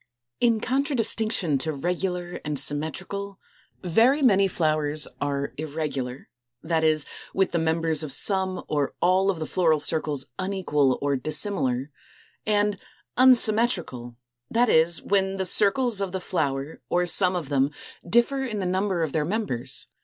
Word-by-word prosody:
In 235 -2 +3
contradistinction 225 - 0
to 155 +4 -1
regular 180 +3 -3
and 150 -1 -3
symmetrical, 190 +8 -4 0.4
very 235 - +3
many 200 -6 +5
flowers 155 -4 +1
are 140 0 -2
Irregular, 145 -4 -4 0.4
that 160 0 0
is, 155 -2 +2 0.3
with 190 -1 +2
the 170 - 0
members 160 -1 +1
of 155 -3 -4
some 190 +3 +1
or 145 -3 -1
all 185 +2 +3
of 190 - 0
the 160 - -4
floral 160 -2 +2
circles 145 -2 -1
unequal 175 -9 +1
or 140 -1 +1
dissimilar, 145 -3 -2 0.6
and 205 -1 +1 0.4
Unsymmetrical, 215 - +2 0.3
that 240 +1 +2
is, 165 +1 +3
when 195 -1 +1
the 190 - -1
circles 210 +3 +3
of 195 -2 -3
the 190 - -2
flower 145 -5 -3
or 180 0 +1
some 180 +1 +2
of 165 -6 -4
them 140 -1 +2 0.3
differ 240 +8 +2
in 230 -5 -4
the 190 - -2
number 185 -1 0
of 155 - -2
their 155 0 0
members. 150 - -1
175 Hz, 145 wpm, -25 LUFS, 150-200 Hz, 0.6 s, many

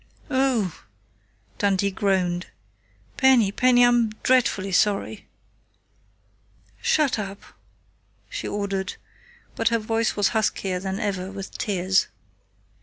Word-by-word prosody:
"Oh!" 260 - 0 0.8
Dundee 200 -1 +1
groaned. 185 -3 0 0.7
"Penny, 255 -7 +4
Penny! 245 +2 +4
I'm 240 -2 +3
dreadfully 225 -7 +2
sorry." 205 +2 0 1.5
"Shut 290 -7 +2
up!" 200 -1 -6 0.8
she - - -5
ordered, 195 -2 -3 0.6
but 230 - 0
her 230 - +2
voice 225 +1 -1
was 205 -2 +2
huskier 200 -4 -1
than 190 +1 -4
ever 195 -3 -3
with 195 -1 -8
tears. 190 -2 +1
200 Hz, 100 wpm, -24 LUFS, 190-230 Hz, 1.5 s, Penny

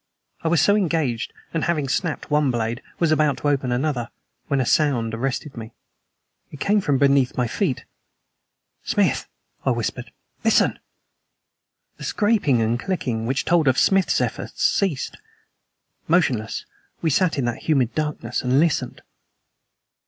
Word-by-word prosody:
I - - -2
was 165 0 +3
so 205 - +4
engaged, 160 - 0 0.2
and, 165 - 0
having 155 -5 0
snapped 155 +3 -2
one 150 -2 +3
blade, 120 0 -2 0.2
was 170 -2 +2
about 150 -3 +2
to 145 - 0
open 135 -3 0
another, 125 -2 -1 0.4
when 140 - +1
a 130 - +1
sound 120 -6 +2
arrested 135 +4 -3
me. 115 -1 -8 0.8
It 145 - -11
came 205 +5 +2
from 145 -7 +1
beneath 140 -2 +3
my 125 - +2
feet. 115 - -2 1.0
"Smith," - - +1 0.4
I - - +1
whispered, - - -2 0.3
"listen!" - - +3 1.2
The - - -10
scraping 200 - +2
and 115 +2 0
clicking 120 -10 -2
which 135 +2 -1
told 165 -3 +3
of 130 0 +3
Smith's 195 -1 +3
efforts - - -3
ceased. 165 -9 0 0.9
Motionless, 135 -11 +1 0.4
we 160 - +2
sat 165 +2 +2
in 135 - 0
that 120 +6 -4
humid 130 -6 +2
darkness 150 -1 -2
and 130 +2 +2
listened. 165 -1 0
140 Hz, 145 wpm, -23 LUFS, 125-160 Hz, 1.2 s, so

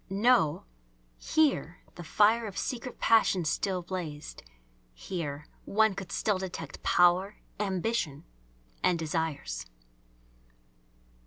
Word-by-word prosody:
No; 200 - +3 0.5
here 280 - +1
the 175 - -9
fire 215 +7 +3
of 200 -1 -8
secret 250 0 -4
passions 190 -7 +3
still 185 -3 -1
blazed; 170 -5 -6 0.5
here 150 - -5 0.2
one 220 0 +3
could 190 -2 -7
still 205 -3 0
detect 170 -6 -6
power, 180 +3 +3 0.2
ambition, 190 -6 -1 0.6
and 180 -2 +2
desires. 155 - -3
185 Hz, 95 wpm, -29 LUFS, 160-210 Hz, 0.6 s, No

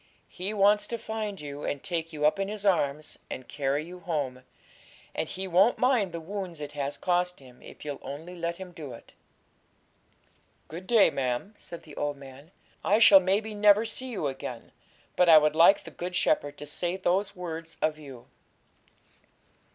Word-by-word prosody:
He 185 +3 -4
wants 210 0 +3
to 235 - -3
find 215 -3 -4
you, 145 0 -7
and 140 - -3
take 165 -2 -3
you 150 -2 -1
up 155 +6 +3
in 195 - 0
His 210 0 -5
arms, 155 -6 +1
and 130 - -7
carry 145 +1 -1
you 180 +2 -10
home; 145 -8 -3 0.7
and - - -3
He 190 +1 -4
won't 190 +6 +4
mind 250 -7 +2
the 170 - -5
wounds 180 -1 -6
it 145 -1 -6
has 145 -1 -3
cost 180 0 0
Him, 125 -2 -16
if - - -12
you'll 145 -1 -4
only 155 +7 -8
let 170 0 -3
Him 190 -1 -9
do 150 -7 -8
it. 115 - -14 1.6
'Good 175 +4 -8
day, 230 -4 +5
ma'am,' 130 - -2
said 170 - -9
the 150 - -13
old 145 -1 -2
man; 135 +2 -13 0.3
'I 205 - +4
shall, 210 -3 +9
maybe, 200 +4 0
never 210 +1 +5
see 255 +3 -3
you 225 -11 -3
again; 135 -3 -5 0.4
but 180 -1 +4
I 160 - +10
would 150 0 +3
like 170 +5 +6
the - - -10
Good 180 +1 -5
Shepherd 145 -4 +1
to 150 - -8
say 175 +5 -2
those 190 +2 0
words 165 -2 -6
of 155 0 0
you.' 135 -5 -11
170 Hz, 180 wpm, -28 LUFS, 145-195 Hz, 1.6 s, I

